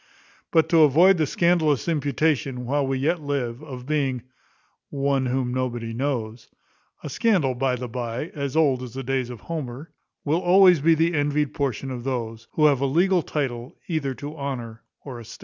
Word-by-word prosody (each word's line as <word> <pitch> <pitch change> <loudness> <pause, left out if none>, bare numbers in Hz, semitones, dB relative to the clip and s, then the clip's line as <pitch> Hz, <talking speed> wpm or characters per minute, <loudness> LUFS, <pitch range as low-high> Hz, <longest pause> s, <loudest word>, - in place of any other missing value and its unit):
But 160 -2 +3
to 165 -1 +5
avoid 165 +6 +5
the 155 - +2
scandalous 160 -6 +2
imputation, 145 -4 0
while 140 +2 0
we 135 0 -1
yet 160 +5 0
live, 135 -4 -3
of 130 -5 -9
being 135 -4 -1 0.7
one 140 -2 0
whom 125 -1 -1
nobody 120 -3 -3
knows 120 -3 -3 0.5
(a - - -5
scandal, 160 - +1
by 125 +1 0
the 125 0 -5
bye, 120 +4 -4
as 140 -2 -4
old 140 -6 +3
as 125 -1 -8
the 135 - -4
days 130 -1 -1
of 120 -4 -9
Homer[*]) 150 -2 -6 0.3
will 155 +4 +1
always 180 -1 +6
be 165 +2 +4
the 165 +2 +1
envied 145 -1 0
portion 135 -1 -2
of 125 -2 -5
those, 115 -3 -4
who 155 - +3
have 140 -3 +4
a 140 - +2
legal 175 +6 +3
title 130 -6 -4
either 145 -6 -2
to 145 +3 -7
honour 120 -6 -5 0.2
or 130 -4 -7
estate. 115 0 -11
140 Hz, 180 wpm, -24 LUFS, 125-155 Hz, 0.7 s, always